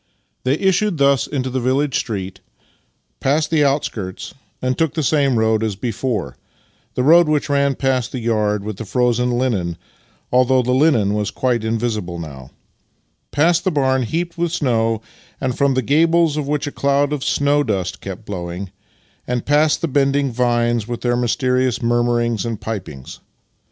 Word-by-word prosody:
They 130 +2 +3
issued 190 +1 +1
thus 140 -2 +3
into 130 -3 -3
the 130 - -1
village 130 +3 0
street, 95 -4 -5 0.8
passed 150 +3 +1
the 155 -2 +3
outskirts, 115 -9 -2 0.3
and 130 0 -1
took 160 -1 0
the 160 - 0
same 140 -3 +2
road 110 0 +2
as 110 -3 -1
before 115 -1 -3 0.3
— - - -39
the 125 - 0
road 170 +4 +6
which 150 -1 0
ran 140 -1 +2
past 130 -3 0
the - - -4
yard 105 -3 0
with 105 -2 -5
the - - -5
frozen 125 +2 +1
hnen 120 -9 0 0.6
(although 130 +1 +3
the 125 - 0
linen 130 -7 +3
was 105 -1 -1
quite 125 -3 -1
invisible 110 -6 -2
now), 70 -6 -9 0.8
past 165 +3 +2
the 190 - +2
barn 130 -5 +1
heaped 165 +8 -3
with 170 -1 0
snow, 115 -8 0 0.4
and 130 -2 -2
from 140 -1 +2
the 130 - +1
gables 165 +3 +3
of 150 -2 -2
which 150 0 -1
a 145 - -4
cloud 140 +1 +1
of 140 -3 -3
snow 145 +1 +2
dust 95 -7 -2
kept 100 +3 -7
blo\Nang, 90 -1 -5 0.6
and 125 -1 -2
past 150 +1 +3
the 170 - 0
bending 140 -1 +1
vines 120 -2 +1
with 120 -1 -5
their 120 -1 +1
mysterious 125 0 +1
murmurings 120 -1 +1
and 115 -3 -4
pipings. 90 - -7
125 Hz, 165 wpm, -19 LUFS, 110-145 Hz, 0.8 s, road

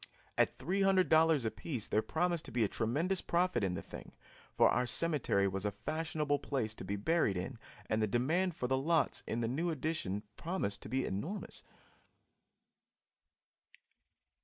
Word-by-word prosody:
At - - +2
$300 180 -6 +3
apiece 115 +1 -2
there 110 - +2
promised 170 +4 0
to - - -7
be 120 -1 +2
a - - +3
tremendous 155 - 0
profit 175 - +1
in 90 -2 0
the - - -5
thing, - - -10 0.4
for - - +5
our 125 0 +2
cemetery 130 -9 +2
was 95 0 -2
a 105 - +1
fashionable 150 +6 -1
place 120 -7 -2
to 110 - -8
be 100 +2 -2
buried 105 - +1
in 110 +7 -5 0.3
and 110 +2 0
the 110 - +2
demand 160 - +1
for 125 - -2
the 130 +1 +1
lots 160 +2 +2
in 115 - -1
the 115 - 0
new 155 +9 -1
addition 155 - -2
promised 165 - -2
to - - -8
be 130 +2 0
enormous. 160 - -4
135 Hz, 160 wpm, -34 LUFS, 110-165 Hz, 0.4 s, for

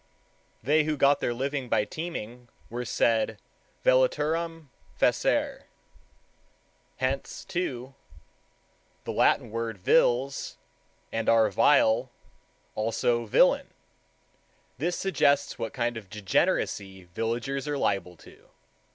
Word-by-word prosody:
They 150 +5 +3
who 155 -1 -1
got 140 +1 +4
their - - -1
living 135 +1 -3
by 105 - +2
teaming 125 -8 -7 0.2
were 120 +1 -4
said 115 -2 +1 0.5
vellaturam 165 - +1 0.3
facere. - - +1 1.3
Hence, 130 +2 -3
too, 135 -9 -4 1.1
the - - -4
Latin - - +2
word 115 -1 -3
vilis 125 +8 +1 0.5
and 115 0 -1
our 110 -2 +4
vile; 125 +2 +4 0.6
also 115 +2 0
villain. - - +3 1.0
This 175 +5 -1
suggests 145 -7 +1
what 115 - -3
kind 120 -1 -2
of 105 -4 -10
degeneracy 95 -1 -1
villagers 120 +7 -2
are 145 -1 -1
liable 90 -8 -1
to. - - -18
125 Hz, 100 wpm, -27 LUFS, 115-145 Hz, 1.3 s, got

